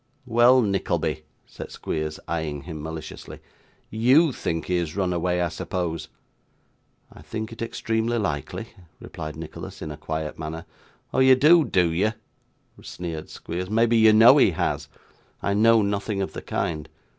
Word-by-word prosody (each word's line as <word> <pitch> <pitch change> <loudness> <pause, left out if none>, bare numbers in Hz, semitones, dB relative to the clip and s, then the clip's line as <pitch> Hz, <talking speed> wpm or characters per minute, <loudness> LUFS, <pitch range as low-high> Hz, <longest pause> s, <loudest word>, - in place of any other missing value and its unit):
'Well, 120 +1 +5
Nickleby,' 85 -6 -1 0.2
said - - -9
Squeers, 75 -1 -4
eyeing 80 -3 -3
him 80 -3 -7
maliciously. 80 0 -8 0.5
'YOU 130 +9 +4
think 80 -9 -3
he 90 - 0
has 85 -2 -3
run 95 -2 0
away, 90 +1 0
I 85 - 0
suppose?' 80 -2 -4 1.1
'I - - -14
think 110 0 -6
it 115 - -10
extremely 115 0 -1
likely,' 100 - -3 0.3
replied 75 -1 -7
Nicholas, 80 0 -8
in 75 - -6
a 75 - -8
quiet 80 -1 -5
manner. 80 +1 -6 0.5
'Oh, - - +1
you 130 0 +7
do, 155 +6 +6
do 90 - +2
you?' 100 +7 +1 0.7
sneered 85 -3 -6
Squeers. 90 +2 -5
'Maybe 115 +2 +3
you 110 -1 +6
know 110 +2 +8
he - - +6
has?' - - -2 0.6
'I 100 - +1
know 110 +1 +5
nothing 100 0 -2
of - - -6
the - - -6
kind. 75 -3 -3
90 Hz, 155 wpm, -24 LUFS, 80-115 Hz, 1.1 s, know